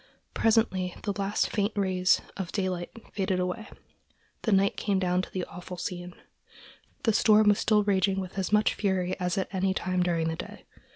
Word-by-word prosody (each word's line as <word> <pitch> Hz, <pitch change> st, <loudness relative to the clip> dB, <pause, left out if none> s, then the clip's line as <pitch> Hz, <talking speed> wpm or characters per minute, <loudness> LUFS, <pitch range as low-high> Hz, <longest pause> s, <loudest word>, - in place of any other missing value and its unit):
Presently 190 Hz, -5 st, +2 dB
the 205 Hz, -, -1 dB
last 200 Hz, 0 st, 0 dB
faint 205 Hz, 0 st, 0 dB
rays 185 Hz, -2 st, +2 dB
of 190 Hz, -3 st, -5 dB
daylight 185 Hz, -3 st, -2 dB, 0.2 s
faded 190 Hz, -2 st, 0 dB
away, 180 Hz, +5 st, -3 dB, 0.8 s
and 210 Hz, -4 st, +4 dB
night 195 Hz, +1 st, +2 dB
came 200 Hz, -2 st, 0 dB
down 180 Hz, -1 st, +1 dB
upon 185 Hz, -, -4 dB
the 185 Hz, -2 st, -3 dB
awful 180 Hz, +1 st, -9 dB
scene. 175 Hz, 0 st, -5 dB, 0.9 s
The 225 Hz, -, +3 dB
storm 215 Hz, 0 st, +5 dB
was 205 Hz, +1 st, +3 dB
still 210 Hz, -1 st, +3 dB
raging 195 Hz, -1 st, +2 dB
with 190 Hz, +1 st, -5 dB
as 190 Hz, -, -2 dB
much 210 Hz, 0 st, +4 dB
fury 185 Hz, -3 st, 0 dB
as 180 Hz, 0 st, -1 dB
at 190 Hz, 0 st, -2 dB
any 190 Hz, 0 st, +1 dB
time 185 Hz, 0 st, 0 dB
during 170 Hz, -2 st, +1 dB
the 160 Hz, -, -1 dB
day. -, -, -9 dB
190 Hz, 180 wpm, -28 LUFS, 180-205 Hz, 0.9 s, storm